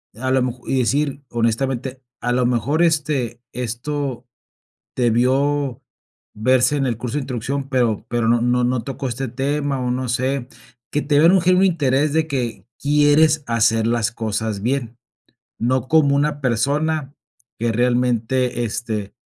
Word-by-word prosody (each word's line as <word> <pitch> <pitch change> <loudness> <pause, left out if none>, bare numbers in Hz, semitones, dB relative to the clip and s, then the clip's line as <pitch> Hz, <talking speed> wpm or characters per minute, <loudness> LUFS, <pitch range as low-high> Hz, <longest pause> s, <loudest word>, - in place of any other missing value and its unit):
a 130 +4 -3
lo 130 0 +3
mejo 125 0 -5
y 135 - +1
decir: 140 +3 0
"Honestamente, 125 +3 -1 0.2
a 120 - 0
lo 125 0 +2
mejor, 125 +7 +1
este, 145 -8 0
esto, 125 +2 -4 0.7
debió, 130 +3 +1 0.5
verse 130 +6 +3
en 140 - 0
el 120 -3 -2
curso 125 +4 -4
de 150 - -1
introducción, 135 +2 -3
pero 120 -6 +1
pero 120 -1 0
no 120 0 +3
no 125 0 +2
no 125 0 +1
tocó 135 +1 -4
este 125 +2 -3
tema, 140 +2 -1
o, 125 -1 -1
no 125 +1 -2
sé". 130 +1 -1 0.5
Que 150 - +1
te 145 -1 +2
vean 165 +4 +6
un 190 - +5
genuino 180 +2 +4
interés 145 -5 +2
de 160 0 +1
que 125 -6 -3
quieres 150 +1 +3
hacer 115 -1 +2
las 115 -1 0
cosas 110 -2 -3
bien. 120 -1 -2 0.6
No 130 +2 0
como 145 -2 +4
una 145 +1 0
persona, 140 +4 0 0.5
que 115 +1 0
realmente, 120 +1 +1
este, 110 -3 -4
130 Hz, 155 wpm, -20 LUFS, 120-145 Hz, 0.7 s, vean